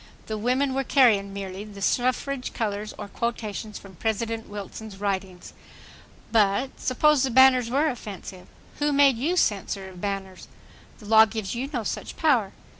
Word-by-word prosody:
The 220 - -4
women 255 +5 0
were 270 +1 0
carrying 225 -8 +4
merely 195 0 -6
the 205 -2 -11
suffrage 255 +5 0
colors 210 -2 -3
or - - -6
quotations 215 -1 -4
from 190 -3 -13
President 225 +2 -2
Wilson's 205 0 -8
writings. 190 -3 -3 0.8
But, 220 +4 +2
suppose 295 +2 +3
the 265 - +1
banners 255 -1 +5
were 280 +5 +2
offensive. 200 - -7 0.3
Who 295 0 +1
made 275 -3 +5
you 335 +8 0
censor 195 - 0
of 180 -1 -12
banners? 195 -2 -4 0.5
The 215 - -14
law 220 +1 +7
gives 215 -3 -4
you 255 +3 -3
no 245 -6 -2
such - - -5
power. 250 - +2
220 Hz, 155 wpm, -25 LUFS, 200-255 Hz, 0.8 s, law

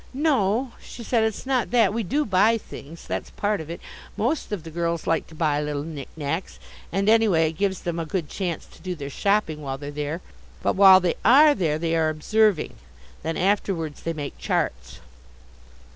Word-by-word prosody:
"No," 260 -5 +1
she 240 - -10
said, 230 0 +1
"it's 220 +1 -2
not 260 -3 0
that. 225 -5 +3
We 230 - -1
do 280 - 0
buy 210 +3 +4
things. 165 -6 -11
That's - - -4
part 205 -3 -1
of 155 - -9
it. 170 - -6 0.4
Most 315 - -1
of 200 -6 -3
the 165 - -9
girls 170 0 -2
like 165 -1 0
to 160 - -14
buy 150 -2 +1
little 150 -1 -3
knick 150 -4 -7
knacks, 160 +4 -3 0.3
and 195 +1 0
anyway 210 -8 +4
it 160 - -16
gives 195 -2 0
them 170 -1 -3
a 165 - -2
good 175 -3 -2
chance 175 -3 -4
to - - -19
do 185 -1 -4
their 140 -3 -7
shopping 200 -4 0
while 135 -2 -4
they're 145 +1 -7
there. 150 +3 -4 0.4
But - - +1
while 190 -1 +8
they 180 -1 +1
are 290 +7 +7
there 160 - 0
they 165 0 -1
are 160 -1 +2
observing. 200 +4 +1 0.4
Then 165 +1 -3
afterwards 185 -5 0
they 165 - -2
make 145 -3 -6
charts." 60 0 -2
175 Hz, 195 wpm, -24 LUFS, 155-210 Hz, 0.4 s, while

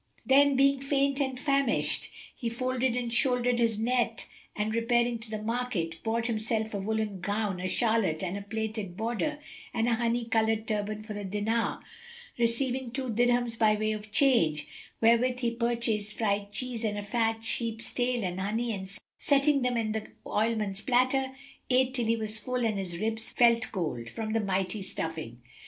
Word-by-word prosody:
Then, 280 +1 +5
being 275 0 +4
faint 275 0 +1
and 265 -2 -1
famisht, 275 -3 +1 0.3
he 235 - -3
folded 255 +1 0
and 240 -2 -2
shouldered 245 -1 +2
his 230 -2 +2
net 230 0 0 0.3
and, 210 +1 -1
repairing 235 +1 +2
to 220 0 -9
the 215 -1 -3
market, 220 -9 -2
bought 230 +1 -1
himself 220 -1 -1
a 200 - -2
woollen 215 -1 -2
gown, 205 -1 -1
a 185 - -4
calotte 220 -7 +1
with 185 +1 -2
a 200 - -4
plaited 220 -4 -3
border 240 +7 -1 0.4
and 225 0 +1
a 240 - +3
honey 235 +1 0
coloured 220 -1 +1
turband 215 0 -2
for 215 - -6
a 205 - -4
dinar 210 +4 -1 0.6
receiving 245 +2 +1
two 260 0 -3
dirhams 240 0 +1
by 215 -1 +5
way 215 +1 0
of 215 0 -5
change, 210 - +3 0.4
wherewith 245 +2 +4
he 235 -2 +1
purchased 230 -3 -1
fried 200 -2 0
cheese 245 0 -3
and 210 -2 -1
a 205 - -3
fat 225 +1 0
sheep's 230 0 +1
tail 245 -2 0
and 180 0 -2
honey 225 +4 -1
and 190 -2 -5 0.3
setting 280 0 +3
them 250 -1 +1
in 220 -2 0
the 215 0 -3 0.2
oilman's 210 -2 0
platter, 260 +1 +2 0.4
ate 255 0 +3
till 245 -3 0
he 230 - +3
was 215 -1 -3
full 250 +2 -1
and 215 -3 0
his 175 -3 -4
ribs 225 +3 -2
felt 235 -1 +4
cold[FN#276] 150 - -3
from 220 - -4
the 225 - +2
mighty 195 0 -1
stuffing. 160 -10 -5
225 Hz, 175 wpm, -29 LUFS, 210-245 Hz, 0.6 s, Then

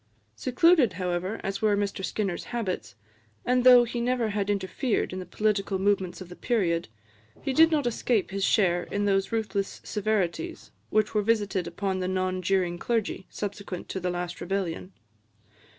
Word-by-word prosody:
Secluded, 260 - +4
however, 180 +3 -2
as 195 0 -3
were 210 -2 +3
Mr 200 -1 -2
Skinner's 195 -3 -2
habits, 185 - -4 0.5
and 250 0 +2
though 250 -1 +9
he 240 0 -3
never 245 -2 +1
had 205 -1 -1
interfered 205 +3 -1
in 185 - -4
the 180 - -7
political 200 0 0
movements 190 -2 0
of 185 - -8
the 180 - -9
period, 175 -9 0 0.6
he 270 - -1
did 320 +4 +7
not 300 -4 +1
escape 235 -4 0
his 195 0 -2
share 180 -4 +3
in 205 0 -2
those 195 -1 +1
ruthless 205 -3 -2
severities 215 - -2 0.2
which 215 -1 +1
were 210 - +2
visited 205 -4 0
upon 190 +2 -2
the 185 - -1
non 185 0 -1
juring 180 -2 0
clergy 225 -4 -1
subsequent 200 -3 -5
to 190 - -3
the 180 0 -2
last 175 0 -4
Rebellion. 190 -1 -3
200 Hz, 165 wpm, -27 LUFS, 185-225 Hz, 0.6 s, though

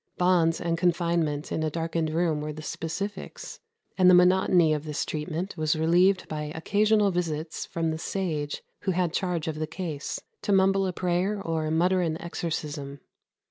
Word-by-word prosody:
Bonds 175 -2 +3
and 170 -1 -1
confinement 170 -4 0
in - - -1
a 155 - 0
darkened 165 0 -2
room 160 -1 0
were 150 0 -3
the 155 +1 -8
specifics; 190 +7 -5 0.4
and 185 0 +7
the 180 - +8
monotony 180 -2 +5
of 150 -1 -2
this 150 -2 -3
treatment 165 +4 -4
was 155 0 +1
relieved 175 +4 +3
by 150 -1 -4
occasional 205 +4 +2
visits 160 -3 -3
from 165 -1 -1
the 160 - -4
sage 160 -6 -3 0.2
who 190 - -1
had 175 -2 0
charge 175 -4 -1
of 155 -1 -3
the 155 - -2
case, 155 -4 -4 0.2
to - - -1
mumble 195 0 +4
a - - -1
prayer 180 +3 0
or 160 -4 -2
mutter 180 +4 +2
an 165 -2 -1
exorcism. 150 -5 -4
170 Hz, 170 wpm, -27 LUFS, 155-185 Hz, 0.4 s, the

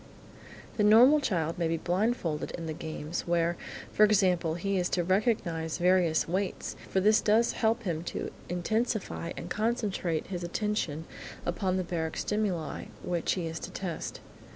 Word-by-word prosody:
The 210 - +3
normal 240 +8 +7
child 170 - -1
may 170 - +2
be 165 0 0
blindfolded 175 -2 0
in 165 - -5
the 160 - -3
games 155 +2 -5
where, 170 0 +2 0.4
for 215 - +4
example, 185 -6 +3
he 195 +3 -1
is 180 - 0
to 175 - +2
recognise 175 -5 0
various 175 -3 +3
weights, 185 +3 -2
for 190 - +2
this 215 +3 +5
does 220 +3 +3
help 230 +1 +1
him 170 -5 -2
to - - -4 0.2
intensify 200 0 -1
and - - -5
concentrate 210 -7 -1
his 180 -2 -5
attention 175 -4 -2 0.4
upon 185 +1 0
the 185 - 0
baric 165 -2 -3
stimuli 200 -7 -1 0.2
which 175 -2 0
he 180 -3 -2
is 165 0 -4
to - - -6
test. 180 -4 -5
180 Hz, 155 wpm, -29 LUFS, 165-210 Hz, 0.4 s, normal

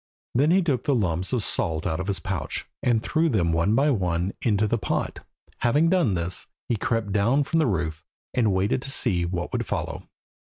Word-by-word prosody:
Then 140 +5 +3
he 185 +2 +4
took 140 -7 0
the 140 - +2
lumps 90 -5 0
of 125 -5 +1
salt 80 -4 0
out 80 - -1
of 95 - -3
his 100 -3 0
pouch, 95 0 -3 0.2
and 115 -2 +2
threw 160 +1 +1
them 90 - +1
one 85 +7 +2
by 145 +4 +3
one 90 -4 0
into 105 -2 +2
the 115 +2 0
pot. - - -2 0.4
Having 150 +8 +3
done 170 - +3
this, 85 +1 -3 0.2
he 120 - +1
crept 110 0 -1
down 115 +8 +3
from 165 +4 0
the 155 - +3
roof, 80 -6 -2 0.3
and 115 -5 +2
waited 95 +6 +1
to 135 - -5
see 95 -10 +2
what 85 0 -3
would - - -1
follow. - - -4
105 Hz, 205 wpm, -25 LUFS, 90-130 Hz, 0.4 s, he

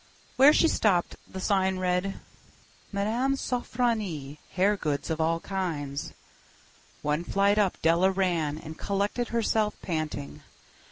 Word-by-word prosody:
Where 275 +3 +8
she 330 - +4
stopped 195 - +2 0.2
the 190 - -6
sign 190 -1 +1
read: 185 +1 -1 0.7
"Mme. 225 +7 0
Sofronie. 220 - -2
Hair 195 +3 +3
Goods 150 -3 -2
of 160 0 -1
All 165 +1 +1
Kinds." 155 -8 -3 0.9
One 150 +3 0
flight 200 +3 +2
up 200 -3 +1
Della 170 +3 +4
ran, 175 -6 0
and 160 0 -9
collected 205 +4 -1
herself, 220 -2 +1
panting. 155 -4 -4
190 Hz, 120 wpm, -27 LUFS, 160-210 Hz, 0.9 s, Where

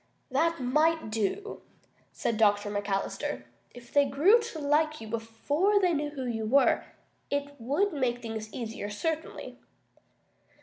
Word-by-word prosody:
"That 330 +5 +2
might 305 +1 +2
do," 225 - -2 0.5
said 225 - -2
Dr. 205 -1 +3
McAllister. 205 -1 -2 0.3
"If 240 -1 -14
they 285 - +6
grew 305 - +5
to 455 -7 -6
like 305 +1 +1
you 220 - -8
before 230 - +1
they 365 -3 +3
knew 295 -1 -1
who 275 -3 -5
you 225 -3 -2
were, 275 +5 +4 0.4
it 285 0 -2
would 300 - +1
make 250 -4 0
things 220 -2 -6
easier, 225 -4 -5
certainly." 320 +10 -4
275 Hz, 135 wpm, -29 LUFS, 225-315 Hz, 0.5 s, they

